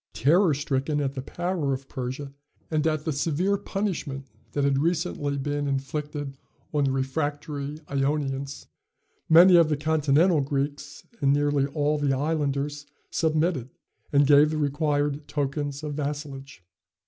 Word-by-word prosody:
Terror 160 - +4
stricken 145 +1 -1
at 140 -2 -1
the 135 - -4
power 170 -1 -2
of 130 0 -5
Persia 130 +2 -5 0.4
and 155 0 +1
at 155 -1 -1
the 160 - 0
severe 165 +7 +1
punishment 180 -10 -3 0.3
that 145 - 0
had 140 -1 +2
recently 160 -3 -1
been 145 +1 -2
inflicted 145 +1 -3 0.4
on 145 -2 +2
the 135 - +1
refractory 145 +2 -2
Ionians, 140 0 -2 0.6
many 175 +3 +8
of 165 -2 +5
the 150 - +1
continental 155 +2 +3
Greeks 140 +1 -3 0.2
and 140 - +4
nearly 145 -1 +2
all 150 +1 0
the 145 -2 +1
islanders 145 -1 -1 0.2
submitted, 155 -5 0 0.4
and 145 0 +5
gave 145 +1 +6
the 155 - -2
required 145 0 0
tokens 145 0 -2
of 150 -1 -3
vassalage. 140 - -5
145 Hz, 135 wpm, -26 LUFS, 140-155 Hz, 0.6 s, many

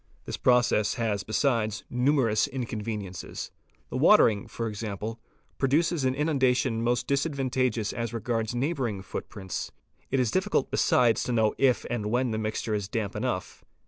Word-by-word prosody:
This - - -4
process 120 -4 +3
has 110 -4 -1
besides 110 0 0
numerous 125 -4 +2
inconveniences; 105 -7 -5 0.4
the - - -2
watering 105 -3 +5
for 115 - -4
example, 110 +1 -5 0.4
produces 150 +2 +2
an 130 0 +1
inundation 130 -5 +1
most 120 0 +1
disadvantageous 130 -6 0
as 115 -2 -3
regards 115 -1 -2
neighbouring 125 - -1
footprints; 95 -2 -5 0.4
it 135 - +1
is 125 -3 +2
besides - - -3
difficult 130 - +2
to - - -1
know 110 -2 +2
if 130 -3 +3
and 115 -4 -2
when 125 +2 +1
the 110 - -1
mixture 110 0 -2
is 105 -2 -1
damp 105 -1 -3
enough. 105 -4 -3
115 Hz, 145 wpm, -27 LUFS, 110-130 Hz, 0.4 s, watering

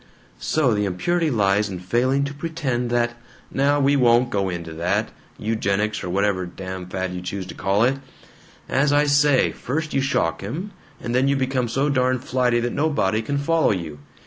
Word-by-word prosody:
"So 140 -7 +1
the 105 -1 0
impurity 160 - 0
lies 105 -4 +2
in 95 - -5
failing 125 +9 +1
to 140 0 -3
pretend 140 -6 -2
that 120 0 +1 0.2
" - - -26
"Now 140 +2 +2
we 140 +1 +3
won't 120 -2 +4
go 100 -1 0
into 85 -2 -5
all 80 - -9
that 100 +6 0 0.3
eugenics 105 -1 -1
or 90 - -4
whatever 95 -1 0
damn 95 0 -7
fad 95 0 -3
you 90 - -5
choose 95 +1 -4
to - - -8
call 100 +3 +1
it. 130 +3 +2 0.7
As 140 +2 +2
I 145 +1 +4
say, 145 -2 +4
first 155 +4 -4
you 135 - +2
shock 135 - 0
him, 160 - -5 0.3
and 120 - -4
then 130 +2 +3
you 140 - +3
become 130 -2 0
so 135 +5 0
darn 130 -2 +2
flighty 125 -1 +1
that 120 0 -2
nobody 140 -9 +1
can 140 +5 -2
follow 160 +3 +2
you. 85 -7 -3
120 Hz, 195 wpm, -22 LUFS, 100-140 Hz, 0.7 s, won't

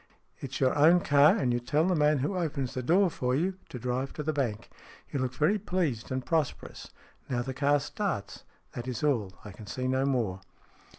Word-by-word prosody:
It 140 - -6
is - - -3
your 130 -1 +2
own 165 +5 +6
car, 145 -1 +5
and 125 -3 +1
you 120 - +1
tell 145 +6 +1
the 185 - +2
man 150 -2 +3
who 190 - -2
opens 140 -7 -2
the 130 - -3
door 175 +8 +3
for 125 -3 -1
you 185 +6 -1
to - - -7
drive 125 +2 -3
to 150 - -5
the 155 +1 -1
bank. 115 -7 -2 0.4
You 140 - -2
look 130 0 -2
very 170 +10 +2
pleased 170 - -2
and 130 0 -2
pros 160 -4 +1
perous. - - -12 0.4
Now 120 -1 -1
the 130 - -5
car 145 +2 +2
starts. 140 - -4 0.3
That 120 +1 -7
is 125 0 -4
all. 115 -10 +1
I 105 - -7
can 105 +2 -12
see 130 +5 -3
no 130 +1 +1
more." 110 -9 -1
135 Hz, 220 wpm, -29 LUFS, 125-155 Hz, 0.4 s, own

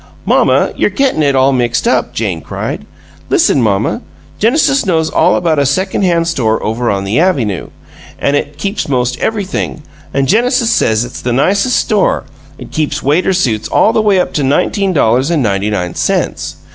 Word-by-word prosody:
"Mamma, - - +2
you're - - +1
gettin' 270 - 0
it 140 -2 +2
all 135 +1 +3
mixed 120 -2 0
up!" - - +1
Jane 95 -7 -3
cried. - - -5 0.4
"Listen, 135 - +3
mamma! 100 -4 0 0.4
Genesis 275 +4 +2
knows 160 -4 0
all - - +3
about 160 -4 +1
a 140 - +2
second 190 +8 -1
hand 170 -3 +1
store 115 -9 0
over 115 +3 -1
on 100 -1 -1
the 100 +7 0
avynoo; 130 - 0 0.5
an' 140 - 0
it 145 0 -2
keeps 200 +1 -3
'most 125 -1 -1
everything, 200 -7 -3 0.3
an' 135 0 0
Genesis 235 - +2
says 110 +1 +1
it's - - -9
the 125 - -2
nicest 200 - +1
store! 210 -3 +1 0.3
It - - -11
keeps 155 -2 -2
waiter 155 +8 +2
suits 120 - 0
all 220 - +2
the 220 - +2
way 205 -3 +2
up - - -1
to 145 - -1
nineteen 190 +8 +1
dollars 130 -3 +2
and 160 -5 +1
ninety 100 -1 0
nine 90 -5 -2
cents. - - -2
145 Hz, 180 wpm, -13 LUFS, 120-190 Hz, 0.5 s, all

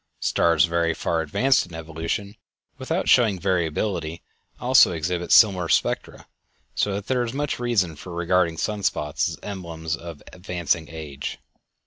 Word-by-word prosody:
Stars 85 -1 +3
very 85 -1 0
far 80 -1 -1
advanced 120 - +2
in 85 - -11
evolution, 80 +6 -4 0.4
without - - -2
showing 110 -6 +4
variability, 85 -2 -1 0.4
also 125 -6 +5
exhibit 85 +2 -3
similar 95 -6 +5
spectra; - - 0 0.5
so 105 - 0
that 100 0 -5
there 125 0 0
is 120 -1 -3
much 145 -1 -2
reason 105 -10 0
for 90 +5 -10
regarding 85 -1 +1
sunspots 95 -7 -1
as - - -7
emblems 85 -5 -4
of 85 -2 -10
advancing 85 -3 -2
age. 75 -4 -6
85 Hz, 135 wpm, -24 LUFS, 80-100 Hz, 0.5 s, also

